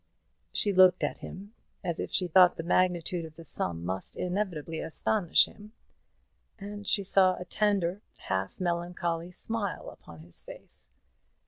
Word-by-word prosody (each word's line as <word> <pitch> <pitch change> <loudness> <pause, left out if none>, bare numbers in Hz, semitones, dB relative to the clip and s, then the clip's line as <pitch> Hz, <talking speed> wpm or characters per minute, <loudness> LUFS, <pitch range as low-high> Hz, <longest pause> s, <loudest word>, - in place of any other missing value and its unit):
She 205 - +1
looked 185 -1 +6
at - - -1
him 200 +3 -9 0.3
as 170 -2 -2
if - - -4
she 180 - +2
thought 180 +1 +6
the 165 - -4
magnitude 175 0 +1
of 160 -1 -10
the 165 - -11
sum 85 - -2
must 95 +1 -3
inevitably 180 -4 -2
astonish 175 +2 +3
him, 210 +1 -14 0.8
and 205 0 -8
she 200 - +2
saw 185 -1 +5
a 180 - -7
tender 200 -1 0 0.2
half 95 0 -3
melancholy 175 -1 -2
smile 205 +2 -3
upon 80 -1 -14
his 85 +1 -4
face. - - -8
180 Hz, 145 wpm, -29 LUFS, 165-195 Hz, 0.8 s, looked